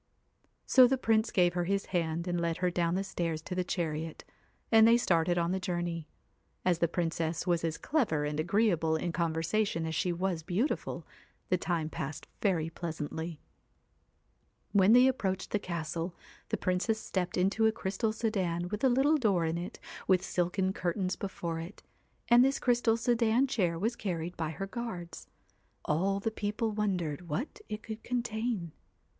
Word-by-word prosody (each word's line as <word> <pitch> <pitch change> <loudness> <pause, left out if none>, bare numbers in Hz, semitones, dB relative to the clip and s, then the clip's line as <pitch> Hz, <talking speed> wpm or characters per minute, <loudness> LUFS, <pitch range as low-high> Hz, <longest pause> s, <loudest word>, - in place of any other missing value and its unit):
So 255 -2 +7
the 265 +2 +1
Prince 225 -2 +2
gave 175 -5 +3
her 175 -1 0
his 200 +2 0
hand 170 0 0
and 175 -1 0
led 170 0 0
her 180 0 +1
down 170 0 +1
the 195 - 0
stairs 170 -4 -2
to 185 - -5
the 180 0 0
chariot; 160 -3 -3 0.5
and 225 -1 +8
they 230 +1 +7
started 175 -6 +2
on 170 0 +1
the 190 - 0
journey. 175 -3 -3 0.6
As 175 -2 +3
the 170 - +3
Princess 165 -1 -1
was 175 -2 +1
as 165 -1 -1
clever 215 - 0
and 150 +1 -2
agree 205 +7 +3
able 160 -2 +1
in 170 +2 -1
conversation 165 +2 0
as 160 - -3
she 180 +3 0
was 175 -1 -1
beautiful, 190 - -2 0.4
the 185 - +3
time 170 -4 -1
passed 150 -1 -5 0.2
very 175 -6 +1
pleasantly. 160 -1 -5 1.3
When 200 +1 +5
they 250 +1 +8
approached 190 -8 -1
the 210 - +1
castle, 170 -1 -4 0.3
the - - 0
Princess 185 +5 0
stepped 185 -4 -2
into 195 +5 +3
a - - +4
crystal 210 +1 -1
sedan 185 -6 -1
with 210 +4 -4
a 265 - +6
little 275 +5 +4
door 200 - +2
in 165 +1 -1
it 175 - -7 0.3
with 185 -1 +4
silken 185 +2 0
curtains 185 +1 -1
before 170 -4 -4
it, 170 +5 -9 0.4
and 240 +1 +7
this 270 +1 +2
crystal 240 -2 +2
sedan 235 +1 +3
chair 185 -11 0
was 225 +7 0
carried 175 -5 -3
by 160 -2 -2
her 195 +5 -4
guards. 195 -5 -6 0.6
All 190 +6 +1
the 220 +3 -1
people 215 +1 -2
wondered 180 -6 -2
what 235 - -3
it 215 +1 -5
could 220 0 -6
contain. 230 -6 -2
180 Hz, 170 wpm, -31 LUFS, 170-220 Hz, 1.3 s, and